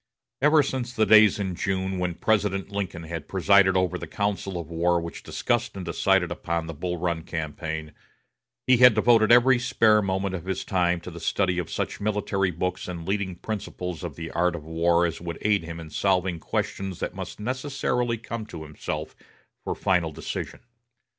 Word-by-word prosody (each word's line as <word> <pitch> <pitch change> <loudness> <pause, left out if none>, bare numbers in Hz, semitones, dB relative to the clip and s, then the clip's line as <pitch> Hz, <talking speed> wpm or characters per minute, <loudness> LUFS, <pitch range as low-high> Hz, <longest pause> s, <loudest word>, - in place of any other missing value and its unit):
Ever 150 +1 +5
since 130 -3 -3
the 110 - +3
days 110 -1 +7
in 95 -3 -2
June, 95 +1 -2
when 90 -2 -1
President 100 -2 0
Lincoln 95 -4 -4
had 80 -1 -6
presided 95 0 +4
over 90 -1 0
the - - -6
council 100 -2 -2
of 85 - -6
war 85 +1 +2
which 85 0 -7
discussed 120 -2 -1
and 95 - -5
decided 90 +1 +2
upon 85 -1 -2
the 80 - -6
Bull 90 +3 -3
Run 85 -1 -1
campaign, 80 -1 -5 0.7
he 130 -1 +5
had 125 -2 +8
devoted 110 0 +4
every 120 +1 +6
spare 115 -4 +4
moment 95 -1 -1
of 90 -2 -5
his 95 -1 -3
time 90 -3 +1
to 90 - -8
the 85 - -9
study 90 +2 0
of 85 - -4
such - - -3
military 100 -2 0
books 90 +1 -3
and 85 -2 -6
leading 95 -2 -1
principles 90 -3 -5
of 85 -5 -5
the 80 0 -6
art 90 0 +1
of 80 - -7
war 85 +2 +2
as 85 - -3
would 85 -1 -5
aid 105 -3 +2
him 85 0 -7
in 80 -2 -9
solving 90 -1 +1
questions 95 +2 -3
that - - -3
must - - -7
necessarily 125 0 -1
come 115 -1 -6
to 80 -6 -8
himself 75 -1 -5 0.5
for - - -3
final 90 -4 +1
decision. 75 - -6
95 Hz, 185 wpm, -25 LUFS, 85-105 Hz, 0.7 s, had